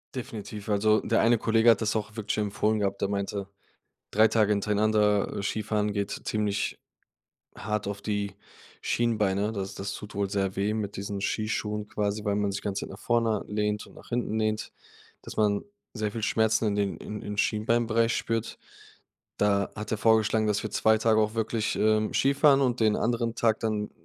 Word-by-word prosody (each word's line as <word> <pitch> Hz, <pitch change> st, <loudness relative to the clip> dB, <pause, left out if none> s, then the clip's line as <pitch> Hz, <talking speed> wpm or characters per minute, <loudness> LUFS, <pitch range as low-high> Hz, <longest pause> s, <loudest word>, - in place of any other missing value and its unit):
Definitiv. 105 Hz, -4 st, -6 dB
Also, 105 Hz, +1 st, +3 dB
der 115 Hz, -, +2 dB
eine 115 Hz, 0 st, +4 dB
Kollege 115 Hz, +1 st, +5 dB
hat 115 Hz, -, +1 dB
das 110 Hz, -1 st, 0 dB
auch 110 Hz, 0 st, -3 dB
wirklich 110 Hz, -1 st, -2 dB
empfohlen 105 Hz, +1 st, 0 dB
gehabt. 100 Hz, -1 st, -1 dB
Der 100 Hz, -, +2 dB
meinte, 100 Hz, 0 st, -3 dB, 0.6 s
3 110 Hz, +2 st, +5 dB
Tage 110 Hz, -1 st, +2 dB
hintereinander, 105 Hz, 0 st, +2 dB
äh, 100 Hz, -, -3 dB
Skifahren 105 Hz, 0 st, -1 dB
geht 100 Hz, -1 st, -1 dB, 0.2 s
ziemlich 105 Hz, -2 st, -1 dB, 0.8 s
hart 105 Hz, -1 st, -3 dB
auf 100 Hz, 0 st, -4 dB
die 100 Hz, -2 st, -2 dB, 0.4 s
Schienbeine. 105 Hz, -3 st, +1 dB
Das 95 Hz, -2 st, -4 dB
das 100 Hz, 0 st, -4 dB
tut 105 Hz, +1 st, -9 dB
wohl 100 Hz, -1 st, -1 dB
sehr 95 Hz, -2 st, -1 dB
weh 100 Hz, +2 st, 0 dB
mit 105 Hz, -2 st, -3 dB
diesen 100 Hz, 0 st, -4 dB
Skischuhen 105 Hz, 0 st, -2 dB
quasi, 105 Hz, -1 st, -2 dB
weil 100 Hz, -1 st, +1 dB
man 100 Hz, -1 st, 0 dB
sich 100 Hz, -, -4 dB
ganze 100 Hz, -1 st, -3 dB
Zeit -, -, -11 dB
nach 95 Hz, -, -10 dB
vorne 115 Hz, -3 st, +1 dB
lehnt 105 Hz, 0 st, -1 dB
und -, -, -17 dB
nach -, -, -15 dB
hinten 120 Hz, -2 st, -1 dB
lehnt, 110 Hz, 0 st, -1 dB, 0.5 s
dass -, -, -9 dB
man 105 Hz, -1 st, +2 dB, 0.3 s
sehr 105 Hz, -3 st, -2 dB
viel 115 Hz, -, -5 dB
Schmerzen 110 Hz, 0 st, +2 dB
in 100 Hz, -, 0 dB
den 100 Hz, -2 st, 0 dB
im 105 Hz, -, -6 dB
im 105 Hz, 0 st, -6 dB
Schienbeinbereich 115 Hz, +2 st, +1 dB
spürt. 115 Hz, 0 st, -2 dB, 0.8 s
Da 100 Hz, -1 st, +2 dB
hat 105 Hz, 0 st, -5 dB
er 110 Hz, -, 0 dB
vorgeschlagen, 110 Hz, 0 st, +3 dB
dass 105 Hz, -1 st, 0 dB
wir 110 Hz, -, -4 dB
2 110 Hz, 0 st, +3 dB
Tage 110 Hz, 0 st, +3 dB
auch 105 Hz, 0 st, 0 dB
wirklich, 115 Hz, -1 st, -1 dB
ähm, 110 Hz, 0 st, +2 dB
Skifahren 140 Hz, +1 st, +4 dB
und 125 Hz, -2 st, +1 dB
den 110 Hz, -1 st, +4 dB
anderen 115 Hz, -1 st, 0 dB
Tag 110 Hz, -1 st, +2 dB
dann 105 Hz, -2 st, -1 dB
105 Hz, 185 wpm, -27 LUFS, 100-110 Hz, 0.8 s, Kollege